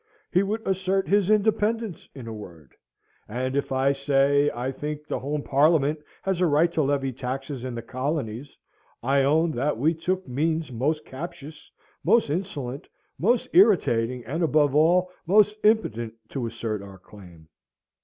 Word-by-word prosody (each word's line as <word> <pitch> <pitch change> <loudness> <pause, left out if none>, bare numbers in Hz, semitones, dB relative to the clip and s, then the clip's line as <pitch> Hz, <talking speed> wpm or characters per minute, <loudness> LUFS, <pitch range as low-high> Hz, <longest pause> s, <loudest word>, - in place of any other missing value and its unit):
He 185 - +4
would 215 +3 -3
assert 190 0 0
his 200 -1 +2
independence 215 -1 +1
in 130 -4 -8
a 115 - -6
word; 85 - -11 0.5
and 130 +4 -3
if, 140 - -1
I 135 +1 +2
say, 140 +1 +2
I 125 +1 -3
think 150 +2 -5
the - - -3
home 145 +2 -3
Parliament 150 +1 +3 0.2
had 190 -2 -1
a 180 - +4
right 160 +3 +3
to 160 - 0
levy 135 -2 0
taxes 130 +1 -5
in 130 -2 -4
the 115 - -5
colonies, 130 0 -4 0.5
I 135 +2 +3
own 160 +4 +3
that 140 0 -1
we 155 +7 +2
took 180 +3 -2
means 155 +4 -1
most 145 +6 -1
captious, 155 +1 -9 0.3
most 230 -11 +3
insolent, 145 -7 -4 0.3
most 230 +6 +2
irritating, 125 - +3
and, 160 +6 -3
above 150 -4 +3
all, 175 +4 +3 0.2
most 210 +2 +5
impotent, 120 - +1
to 125 -4 -3
assert 115 -2 -4
our 100 -1 -11
claim. 90 -5 -15
145 Hz, 155 wpm, -25 LUFS, 130-175 Hz, 0.5 s, most